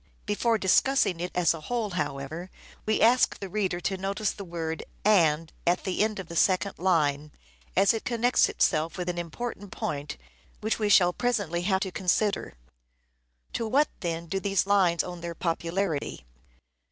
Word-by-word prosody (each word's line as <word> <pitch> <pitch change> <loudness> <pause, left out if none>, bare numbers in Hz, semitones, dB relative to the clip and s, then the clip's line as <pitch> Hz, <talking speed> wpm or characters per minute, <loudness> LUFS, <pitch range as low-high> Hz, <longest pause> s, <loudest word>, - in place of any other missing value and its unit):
Before 225 +2 +1
discussing 195 -1 +3
it 180 +1 -3
as 175 -2 +3
a 165 - -8
whole, 230 +2 -2
however, 155 +2 -4 0.4
we 220 - +1
ask 245 +3 +4
the 195 - -6
reader 190 -3 -1
to 190 +2 -1
notice 195 +2 -1
the 200 - -8
word 165 -2 -4 0.2
" - - -32 0.2
and 155 +2 -6
" - - -20
at 175 - +2
the 190 +1 0
end 215 -1 -1
of 190 -3 -6
the 170 - -8
second 190 +3 +2
line, 150 -5 +1 0.4
as 195 +3 +5
it 225 - -3
connects 240 +1 +2
itself 155 +4 +1
with 180 0 -3
an 175 -1 -2
important 205 +3 -6
point 145 - -4 0.4
which 220 +2 -1
we 210 -1 +1
shall 180 -3 +5
presently 205 -9 -1
have 190 -1 +2
to 190 - -2
consider. 190 - 0 1.0
To 230 - -2
what, 285 +6 +3
then, 170 -2 -3
do 195 +4 -2
these 195 -1 +1
lines 190 -4 +3
owe 175 - -6
their 170 0 -6
popularity 165 - -2
185 Hz, 175 wpm, -27 LUFS, 170-205 Hz, 1.0 s, as